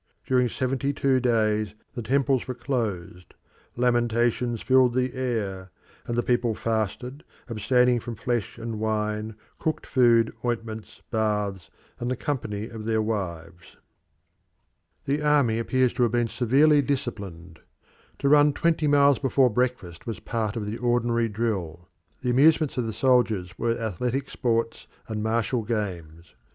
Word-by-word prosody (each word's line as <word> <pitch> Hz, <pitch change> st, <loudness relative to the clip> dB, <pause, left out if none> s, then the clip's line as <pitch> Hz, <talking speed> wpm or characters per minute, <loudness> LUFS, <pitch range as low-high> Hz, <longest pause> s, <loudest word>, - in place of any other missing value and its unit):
During 125 Hz, -2 st, +2 dB
seventy 135 Hz, +3 st, -1 dB
two 135 Hz, -2 st, +2 dB
days 110 Hz, -4 st, +1 dB, 0.2 s
the 125 Hz, -, -4 dB
temples 135 Hz, +2 st, +1 dB
were 130 Hz, -, -4 dB
closed; 110 Hz, -, -4 dB, 0.4 s
lamentations 120 Hz, -1 st, +1 dB
filled 130 Hz, -2 st, +4 dB
the 130 Hz, 0 st, 0 dB
air; 105 Hz, -7 st, -3 dB, 0.4 s
and 120 Hz, -, -2 dB
the 120 Hz, -, +2 dB
people 120 Hz, -2 st, +1 dB
fasted, 115 Hz, +6 st, -3 dB, 0.2 s
abstaining 125 Hz, +2 st, +2 dB
from 115 Hz, 0 st, -6 dB
flesh 120 Hz, +1 st, -2 dB
and 115 Hz, -2 st, -5 dB
wine, 105 Hz, 0 st, -2 dB, 0.2 s
cooked 160 Hz, -, -2 dB
food, 120 Hz, -4 st, +3 dB
ointments, 115 Hz, -2 st, -4 dB
baths, 105 Hz, -4 st, -1 dB, 0.3 s
and 120 Hz, -, -2 dB
the 130 Hz, -, 0 dB
company 110 Hz, -6 st, -3 dB
of 110 Hz, -2 st, -8 dB
their 110 Hz, 0 st, +1 dB
wives. 90 Hz, -5 st, -4 dB, 1.3 s
The 145 Hz, +2 st, 0 dB
Army 145 Hz, -7 st, +3 dB
appears 130 Hz, +1 st, +1 dB
to -, -, -2 dB
have 120 Hz, -1 st, +2 dB
been 120 Hz, -1 st, +1 dB
severely 135 Hz, +6 st, +4 dB
disciplined. 100 Hz, -, -4 dB, 0.6 s
To -, -, -1 dB
run 145 Hz, 0 st, +6 dB
twenty 160 Hz, 0 st, +1 dB
miles 140 Hz, -1 st, +4 dB
before 135 Hz, -2 st, +3 dB
breakfast 120 Hz, -8 st, -2 dB
was 115 Hz, -, -4 dB
part 110 Hz, -1 st, -3 dB
of 110 Hz, -3 st, -3 dB
the 105 Hz, +3 st, -5 dB
ordinary 120 Hz, -1 st, +1 dB
drill. 95 Hz, -6 st, -3 dB, 0.3 s
The 125 Hz, -, 0 dB
amusements 150 Hz, +3 st, +4 dB
of 125 Hz, -3 st, -1 dB
the -, -, -2 dB
soldiers 110 Hz, -7 st, +1 dB
were 115 Hz, 0 st, 0 dB
athletic 125 Hz, +5 st, -2 dB
sports 115 Hz, -2 st, -1 dB, 0.2 s
and 110 Hz, -1 st, -3 dB
martial 115 Hz, +2 st, 0 dB
games. 90 Hz, -, -5 dB
115 Hz, 140 wpm, -25 LUFS, 110-125 Hz, 1.3 s, run